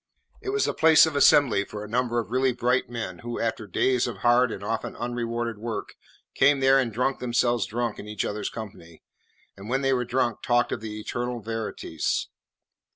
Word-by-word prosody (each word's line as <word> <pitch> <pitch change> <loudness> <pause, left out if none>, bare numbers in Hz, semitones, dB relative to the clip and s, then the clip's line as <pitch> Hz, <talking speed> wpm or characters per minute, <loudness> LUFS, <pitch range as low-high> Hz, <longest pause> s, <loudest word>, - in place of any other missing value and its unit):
It - - -5
was 420 +1 +1
the - - -1
place 160 0 +6
of 160 -2 -3
assembly 140 -7 +5
for 105 +1 -8
a - - -7
number 120 +1 0
of 115 -1 -2
really 130 0 +2
bright 125 +1 0
men, 110 -7 -5
who 120 0 -5
after 115 -1 -2
days 125 +2 +1
of - - -5
hard 120 0 +4
and 100 - -6
often 110 +2 -3
unrewarded 120 -2 -3
work 115 0 -5 0.4
came 140 0 +4
there 135 0 +5
and 125 -4 0
drunk 125 +4 -1
themselves 120 -2 +1
drunk 120 0 -3
in 105 - -8
each 105 -1 -3
other's 105 0 -3
company, 90 -7 -10 0.5
and 100 +2 -10
when 135 +2 +1
they 135 0 +3
were 125 -1 +1
drunk 120 -2 -1
talked 120 0 +1
of - - -3
the 110 -1 -6
eternal 120 +2 -3
verities. 110 -7 -3
120 Hz, 195 wpm, -26 LUFS, 110-125 Hz, 0.5 s, place